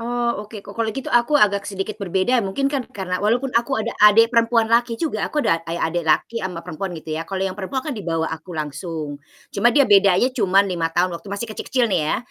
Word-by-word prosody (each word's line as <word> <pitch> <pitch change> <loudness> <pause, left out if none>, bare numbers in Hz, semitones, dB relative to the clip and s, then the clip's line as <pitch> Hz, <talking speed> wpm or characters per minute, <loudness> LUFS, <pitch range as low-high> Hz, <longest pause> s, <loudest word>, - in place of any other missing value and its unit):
Oh 240 -1 -1
oke, 210 -3 -10
ko 200 - -10
kalau 225 +1 -2
gitu 265 +5 -5
aku 240 +5 +4
agak 200 -6 +2
sedikit 200 +2 -5
berbeda 195 +6 +1
mungkin 200 +7 -3
kan, 280 - 0
karena 180 -2 -4
walaupun 245 +5 0
aku 240 +4 +1
ada 225 +1 -2
adik 225 +3 +6
perempuan 230 0 +3
laki 235 0 +2
juga 320 +3 -2
aku 300 -1 -1
ada 165 0 +2
eh, 170 - -2
adik 170 +1 -1
laki 230 +9 +1
sama 175 -3 -5
perempuan 175 +1 -5
gitu 155 0 -7
ya. 160 +1 -4
Kalau 195 -1 -2
yang 190 - -2
perempuan 205 +7 -4
kan 300 - -3
dibawa 165 -7 -2
aku 160 +1 -8
langsung, 150 0 -5 0.3
cuma 215 +4 +3
dia 280 +2 +4
bedanya 200 +3 +4
cuma 200 -4 +3
5 175 -4 -1
tahun 175 +2 0
waktu 170 +4 -8
masih 200 +3 -4
kecil-kecil 235 +3 -1
nih 180 - +2
ya, - - +1
200 Hz, 225 wpm, -21 LUFS, 180-235 Hz, 0.3 s, adik